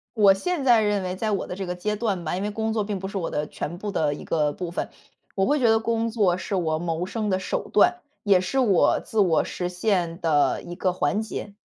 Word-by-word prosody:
我 205 -3 +6
现 315 - -2
在 240 -3 +6
认 205 -1 +1
为 185 0 -3
在 215 +2 -1
我 200 - -1
的 - - -5
这 190 0 -5
个 180 - -3
阶 210 +4 -2
段 200 -6 -2
吧， 160 +3 -2
因 190 - -3
为 205 - -1
工 220 +1 -2
作 220 -2 0
并 200 -1 -3
不 190 - -5
是 200 - -7
我 180 -4 -2
的 150 0 -2
全 170 +4 -6
部 205 +2 -4
的 150 -6 +1
一 - - -9
个 150 -2 0
部 175 +3 -5
分， 175 - -4 0.5
我 195 -1 +2
会 295 +3 +2
觉 240 - +4
得 225 - +4
工 230 0 -1
作 200 -6 +2
是 185 - -4
我 160 -3 0
谋 170 +1 -2
生 215 0 -2
的 185 - +1
手 185 - -3
段， 355 - +4 0.2
也 195 -3 +5
是 185 +9 -2
我 210 -9 +3
自 220 - -1
我 170 -6 +3
实 180 - -4
现 180 -2 -1
的 155 -4 +2
一 175 - -8
个 185 0 0
环 205 +3 0
节。 210 -2 -6
195 Hz, 280 characters per minute, -24 LUFS, 175-215 Hz, 0.5 s, 我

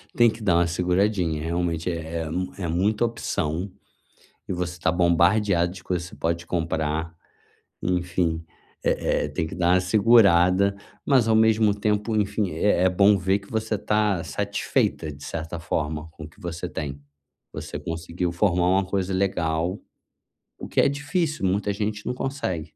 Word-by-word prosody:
Tem 120 -1 +6
que 110 - -7
dar 90 -5 +2
uma 85 0 +3
seguradinha, 90 -2 0
realmente 85 0 -1
é 85 0 -4
é - - -5
mu 90 +3 -3
é 90 -4 -3
muita 100 +7 +1
opção, 90 -5 -2 0.8
e - - -2
você 90 -1 -4
tá 80 - +2
bombardeada 85 +1 +3
de 95 - -11
que - - -27
você 85 0 -3
pode 85 +1 -2
comprar, 80 -1 -2 0.7
enfim, 90 -2 -1 0.4
eh - - +1
eh, - - -2
tem 80 - -2
que - - -7
dar 90 0 +3
uma 90 - +4
segurada, 100 -2 +4 0.3
mas 130 -5 +4
ao 110 - +4
mesmo 110 -1 +4
tempo, 105 +1 0
enfim, 100 -1 0
é 85 +3 +1
é - - +6
bom 100 +3 +5
ver 95 +2 +1
que 100 - -18
você 110 -2 -1
tá 105 -5 +1
satisfeita 100 -3 -1
de 70 +1 -12
certa 80 +1 -5
forma 80 -1 -3
com 80 - -10
o - - -8
que - - -22
você 85 0 -5
tem, 70 -2 -5 0.5
você - - -6
conseguiu 85 +2 -3
formar 90 -1 +2
uma 95 +1 +3
coisa 95 0 -1
legal, 90 -1 0 0.8
o - - -6
que - - +2
é - - +4
difícil, 150 - -1
muita 100 +2 +1
gente 105 0 -3
não - - -1
consegue. 125 - -3
90 Hz, 170 wpm, -24 LUFS, 85-105 Hz, 0.8 s, Tem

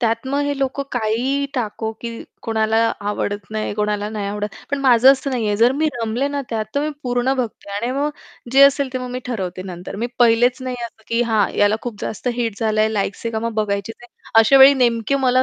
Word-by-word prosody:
त्यात 230 +1 0
मग 280 +1 0
हे 285 -1 -1
लोकं 270 +1 -1
काहीही 250 +5 0
टाको, 220 -2 -2
की 235 - -5 0.3
कोणाला 220 0 0 0.3
आवडत 205 -2 -3
नाही, 215 -1 -2
कोणाला 210 0 -1
नाही 210 -2 -4
आवडत. 210 0 -3 0.2
पण 285 - 0
माझं 260 0 +6
असं 275 0 -3
नाहीये 215 -5 0
जर 235 +4 +4
मी 310 +3 0
रमले 230 +5 -1
ना 285 -1 -3
त्यात 220 -2 -1
तर 285 - +1
मी 305 +1 -1
पूर्ण 245 +1 0
बघते 235 -5 -4
आणि 205 +4 -2
आणि - - -1
मग 295 +1 0 0.4
जे 270 +1 +7
असेल 280 -1 +4
ते 255 - -2
मग 250 -1 -6
मी 255 - -4
ठरवते 185 -6 -4
नंतर. 180 0 -7
मी 230 +4 -1
पहिलेच 240 +1 +4
नाही 255 -1 -4
असं 220 -1 -19
की 230 +1 +1
हां, 220 -4 +2
याला 205 +1 +4
खूप 235 -4 -5
जास्त 220 - -4
हिट 230 -4 -2
झालंय, 215 -1 +2
लाइक्स 205 -1 -3
आहे - - -1
का 220 - -1
मग 230 - -3
बघायचीच 200 +1 -3
आहे. 240 - -14 0.3
अशा 250 +5 +5
वेळी 270 +1 +9
नेमके 230 +2 +1
मला 255 +1 +4
230 Hz, 220 wpm, -20 LUFS, 215-260 Hz, 0.4 s, वेळी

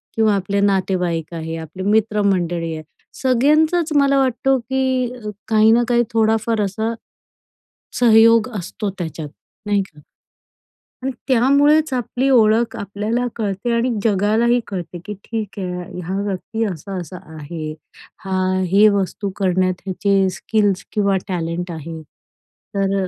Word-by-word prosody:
किंवा 220 -2 +3
आपले 200 +1 -1
नातेवाईक 180 -4 0
आहे, 160 0 -4
आपले 165 +4 -7
मित्रमंडळी 195 -6 +1
आहे, 155 - -7 0.4
सगळ्यांचंच 305 +6 +3
मला 275 -1 +4
वाटतो, 265 +1 +2
की 260 0 -1 0.4
काही 220 0 +5
ना 235 +1 +4
काही 240 -1 +3
थोडाफार 225 0 +2
असा 220 +3 -1 1.1
सहयोग 230 0 +6
असतो, 200 +3 -4
त्याच्यात 160 -3 -5 0.4
नाही 205 -1 +2
का? 155 -6 -14 1.0
आणि 265 - -1 0.2
त्यामुळेच 280 +4 +4
आपली 250 +2 -1
ओळख 230 -2 +3
आपल्याला 210 +5 -2
कळते 205 +1 -2
आणि 235 +2 +1
जगालाही 220 +3 +2
कळते, 180 -3 -6
की 210 - -5
ठीक 220 -3 -5
आहे, 180 -1 -5
हा 185 +4 -3
व्यक्ती 205 +3 -3
असा-असा 180 +1 -7 0.2
आहे, 155 +1 -6 0.5
हा 190 -1 -1 0.3
हे 205 +2 +6
वस्तू 195 +1 -2
करण्यात 185 -1 0
याचे 195 0 +2
स्किल्स 205 -3 0
किंवा 200 -2 +1
टॅलेंट 175 -1 -3
आहे. 160 0 -7
तर 195 +5 -5
अ - - -4
205 Hz, 125 wpm, -20 LUFS, 185-230 Hz, 1.1 s, सहयोग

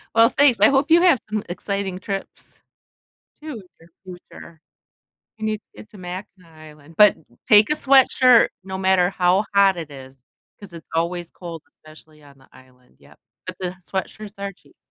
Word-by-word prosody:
Well, 230 0 +6
thanks, 270 -7 +3
I 210 - +7
hope 275 +3 +1
you 340 +2 +5
have 350 -8 +4
some 215 -1 -2
exciting 195 +1 -4
trips, 195 +1 -8 0.8
too 310 -1 -7
in 225 - -9 0.2
your 165 - -20 0.4
future. 165 -2 -14 0.8
You 220 - -6
need 215 0 -1
to - - -26
get 215 - -13
to 205 - -15
Mackinac 180 -1 -10
Island, 155 0 -16
but 210 -1 +6 0.3
take 210 +4 +5
a - - +3
sweatshirt 260 -4 +4 0.2
no 190 0 -6
matter 190 -1 +2
how 185 +2 +1
hot 195 -1 +4
it 165 -3 -7
is, 130 -2 -13 0.4
'cause 200 -4 -13
it's 165 -2 -12
always 170 +1 -2
cold, 170 -3 -10
especially 155 0 -19
on 140 -1 -19
the 130 - -23
island, 125 -1 -22
yep, - - -21 0.3
but 185 -1 -7
the 180 -1 -5 0.2
sweatshirts 205 +2 -6
are 200 0 -5
cheap. 185 - -27
190 Hz, 175 wpm, -21 LUFS, 165-215 Hz, 0.8 s, I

